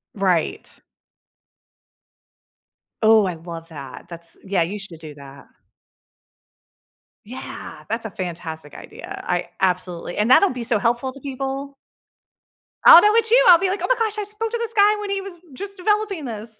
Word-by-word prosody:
Right. 185 -5 0 2.3
Oh, 220 -1 +5
I 180 -2 -2
love 165 0 -9
that, 140 -5 -10
that's 170 -1 -9
yeah, 190 -3 +1
you 200 +5 -5
should 180 -5 -8
do 155 -2 -10
that. 140 -1 -13 1.8
Yeah, 210 -9 -9
that's 225 +1 -3
a 220 - -5
fantastic 165 -4 -6
idea, - - -9
I 175 -1 -2
absolutely 180 -2 -1
and 210 +3 +1
that'll 380 +10 +6
be 250 -2 -5
so 230 -1 +2
helpful 240 +5 0
to 275 - -13
people. 275 +1 -5 1.1
I'll 335 - +10
know 420 +2 +4
it's 450 -1 +3
you, - - +6
I'll 345 -2 +9
be 380 +1 0
like, 390 - -3
"Oh - - 0
my - - +3
gosh, 440 -2 0
I 420 - -2
spoke 425 +2 -4
to 470 - -1
this 465 -1 -3
guy 415 0 +5
when 415 - -5
he 395 0 -1
was 385 -3 -9
just 395 +8 -7
developing 410 -4 0
this." 220 -2 -3
235 Hz, 165 wpm, -21 LUFS, -, 2.3 s, I'll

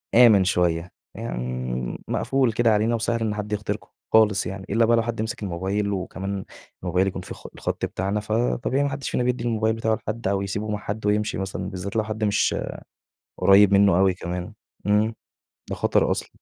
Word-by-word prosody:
آمن 115 -5 +7
شوية. 90 -2 +1 0.2
يعني 60 0 -4
مقفول 135 -3 +1
كده 115 0 +3
علينا 110 +3 +2
وسهل 115 +1 -1
إن 105 -2 0
حد 105 0 -5
يخترقه 105 0 -3 0.2
خالص 105 -4 +5
يعني، 95 +1 -5
إلّا 115 +3 +3
بقى 115 0 +4
لو 115 - +2
حد 115 -1 -3
مِسِك 110 -1 -4
الموبايل 100 +3 -1
وكمان 95 +1 -4 0.4
الموبايل 90 +2 +1
يكون 95 - -3
في - - -8
خ - - -11
الخط - - -2
بتاعنا، 100 +3 -2
فطبيعي 120 +5 0
ما 145 - +1
حدّش 135 0 -4
فينا 125 - 0
بيدّي 125 0 0
الموبايل 110 -2 +1
بتاعه 110 -1 +1
لحد 110 0 -4
أو 100 0 +1
يسيبه 100 +2 -3
مع 105 - -1
حد 105 +1 -5
ويمشي 105 +1 +1
مثلًا، 95 0 -3
بالذات 95 +2 -6
لو 110 - +2
حد 110 0 -4
مش 105 0 +2 0.8
قريب 100 0 +6
منّه 100 -3 +5
أوي 95 -1 +4
كمان، 90 0 -5 0.3
إمم، 105 +2 +3 0.6
ده - - -1
خطر - - +2
أصلًا. - - -1
105 Hz, 185 wpm, -24 LUFS, 95-110 Hz, 0.8 s, آمن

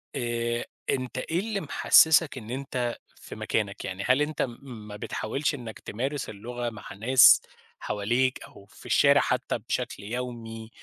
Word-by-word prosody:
آآ 120 0 -1 0.2
أنت 130 -1 -2
إيه 160 +6 -1
اللي 205 0 -2
محسّسك 160 0 +5
إن 110 -3 -9
أنت 125 -2 -3 0.2
في - - -11
مكانك، 100 -3 -2
يعني 95 +1 -4
هل 130 +3 +4
أنت 150 +1 -1
م 120 -3 -2 0.3
ما 105 - -8
بتحاولش 135 +8 -2
إنّك 115 -5 -8
تمارس 135 +6 -4
اللغة 120 +3 -5
مع 110 -3 -10
ناس 120 +6 +7 0.4
حواليك 120 +5 0
أو 100 - -14
في - - -18
الشارع - - +5
حتى - - -1
بشكل - - -4
يومي 115 -1 -6
120 Hz, 150 wpm, -27 LUFS, 110-130 Hz, 0.4 s, ناس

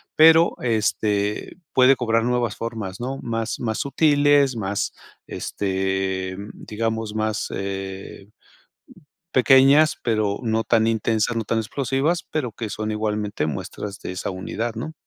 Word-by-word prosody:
pero, 160 +2 +6
este, 105 -3 0 0.2
puede 130 +1 +6
cobrar 115 -2 +1
nuevas 120 -3 0
formas, 110 -5 -5
¿no?, 130 +3 -4
más 115 -1 -3
más 110 -2 -1
sutiles, 145 -1 +3
más 100 -1 -2 0.3
este, 95 -1 -2 0.2
digamos, 110 0 -3
más, 110 -1 -1
eh 95 0 -6 1.1
pequeñas, 135 +4 +6
pero 110 -3 0
no 115 -2 0
tan 115 -1 +2
intensas, 110 0 +1
no 115 - -1
tan 115 +2 -1
explosivas, 135 +8 -1
pero 135 -8 -2
que 115 -2 -5
son 110 +1 -3
igualmente 105 -4 -2
muestras 95 +7 -5
de - - -6
esa 90 - -4
unidad, 110 +5 -4
¿no? 120 +8 -5
110 Hz, 125 wpm, -23 LUFS, 105-125 Hz, 1.1 s, pero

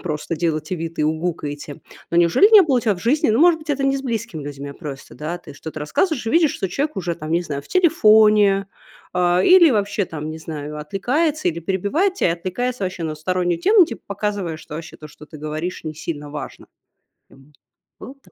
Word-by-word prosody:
просто 160 0 -3
делаете 155 +1 -2
вид, 165 0 -6
и 150 - +2
угукаете. 155 -3 -3 0.3
Но 170 - 0
неужели 175 - +5
не 420 - +10
было 275 -7 +2
у - - -1
тебя 220 -3 +1
в - - -11
жизни, 290 +6 +2
ну, 220 - +2
может 340 0 +5
быть, 305 -1 -6
это 275 -1 0
не 275 0 +2
с 270 - -5
близкими 225 - -4
людьми, 140 0 -7
а 140 - -9
просто, 140 -5 -9
да, 165 +4 -5
ты - - -13
что-то 155 +1 -8
рассказываешь 240 - -1
и - - 0
видишь, 325 +1 +3
что 190 - -3
человек 285 - -2
уже, 175 -3 -2
там, 155 -1 -8
не 170 +2 +1
знаю, 140 -4 -5
в - - -20
телефоне, 215 - +4 0.5
а, 180 0 +2
или 360 -4 +7
вообще, 205 -3 0
там, 155 -1 -6
не 160 - -7
знаю, 150 -2 -7
отвлекается 280 - -1
или 170 0 0
перебивает 200 - 0
тебя, 180 - +1
отвлекается 200 +8 -3
вообще 185 -3 -3
на 155 - -3
стороннюю 175 +2 -1
тему, 405 -3 +5
типа 230 - -8
показывая, 200 -5 -3
что 160 -1 -11
вообще 160 +1 -8
то, 155 - -11
что 150 0 -14
ты 155 0 -12
говоришь, 155 +4 -5
не 155 - -5
сильно 150 -2 -6
важно. 150 0 -8 1.3
Было 260 - -9
такое? 275 - -25
180 Hz, 215 wpm, -21 LUFS, 155-245 Hz, 1.3 s, не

